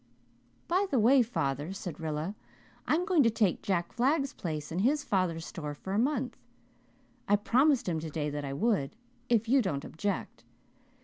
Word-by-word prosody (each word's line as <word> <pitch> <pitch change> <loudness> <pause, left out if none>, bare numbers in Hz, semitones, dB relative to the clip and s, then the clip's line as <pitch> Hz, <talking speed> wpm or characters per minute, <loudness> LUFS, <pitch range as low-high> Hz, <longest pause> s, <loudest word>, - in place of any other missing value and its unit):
"By 375 +4 +2
the 270 - +1
way, 250 +4 +6
father," 150 - -2
said 175 -5 -6
Rilla, 160 +3 -3 0.5
"I'm 335 +4 +2
going 365 -6 +4
to 235 - +5
take 215 -5 +1
Jack 175 -4 -1
Flagg's 275 +3 +1
place 155 -3 -5
in 170 - -2
his 285 +8 +2
father's 180 -5 0
store 150 -4 -6
for 190 +6 -6
a 205 - +2
month. 255 -1 0 0.9
I 205 - +5
promised 255 +5 +3
him 165 -3 0
today 155 -2 -3
that 145 0 -4
I 140 - -4
would, 195 -3 0 0.3
if 230 -1 +2
you 265 +3 +5
didn't 155 - -2
object. 200 +5 -4
200 Hz, 170 wpm, -30 LUFS, 160-255 Hz, 0.9 s, way